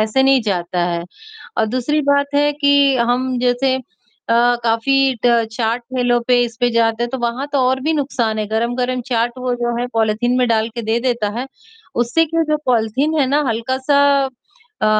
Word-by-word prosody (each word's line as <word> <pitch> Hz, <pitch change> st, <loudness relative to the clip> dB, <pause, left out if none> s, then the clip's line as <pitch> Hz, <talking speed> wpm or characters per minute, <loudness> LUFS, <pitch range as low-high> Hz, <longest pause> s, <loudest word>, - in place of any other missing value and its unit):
ऐसे 220 Hz, +5 st, +2 dB
नहीं 270 Hz, -1 st, +4 dB
जाता 180 Hz, -3 st, -2 dB
है। 170 Hz, 0 st, -2 dB, 0.6 s
और 220 Hz, -, +2 dB
दूसरी 255 Hz, +6 st, 0 dB
बात 285 Hz, 0 st, +2 dB
है 290 Hz, +1 st, +3 dB
कि 285 Hz, -2 st, +3 dB
हम 245 Hz, +1 st, 0 dB
जैसे 250 Hz, +1 st, +1 dB, 0.6 s
अ, 240 Hz, +1 st, +3 dB
काफ़ी 265 Hz, +4 st, +2 dB
ट -, -, +5 dB, 0.2 s
चाट 230 Hz, +1 st, -1 dB
ठेलों 245 Hz, -1 st, 0 dB
पे 245 Hz, -1 st, +4 dB
इस 235 Hz, -1 st, -4 dB
पे 245 Hz, -, +3 dB
जाते 230 Hz, 0 st, +1 dB
हैं 240 Hz, -, -6 dB
तो 265 Hz, -, -4 dB
वहाँ 240 Hz, +3 st, -2 dB
तो 280 Hz, -, +1 dB
और 265 Hz, +1 st, 0 dB
भी 315 Hz, +3 st, 0 dB
नुकसान 260 Hz, -7 st, -1 dB
है, 215 Hz, -, -2 dB
गरम-गरम 245 Hz, +3 st, -1 dB
चाट 240 Hz, -1 st, 0 dB
वो 250 Hz, -1 st, -2 dB
जो 240 Hz, 0 st, -2 dB
है, 245 Hz, -, -1 dB
पॉलीथीन 225 Hz, +3 st, +1 dB
में 250 Hz, -, +2 dB
डाल 220 Hz, -1 st, +1 dB
के 235 Hz, -, -3 dB
दे 225 Hz, +1 st, 0 dB
देता 235 Hz, -4 st, 0 dB
है, 255 Hz, -, -4 dB, 0.5 s
उससे 240 Hz, +8 st, +2 dB
क्या 330 Hz, +1 st, 0 dB
जो 305 Hz, -, +3 dB
पॉलीथीन 255 Hz, +6 st, +1 dB
है 265 Hz, -, +2 dB
ना 290 Hz, +2 st, +2 dB
हल्का 230 Hz, +3 st, -2 dB
सा 280 Hz, +2 st, +2 dB, 0.8 s
अ, -, -, +3 dB
245 Hz, 195 wpm, -18 LUFS, 230-270 Hz, 0.8 s, ट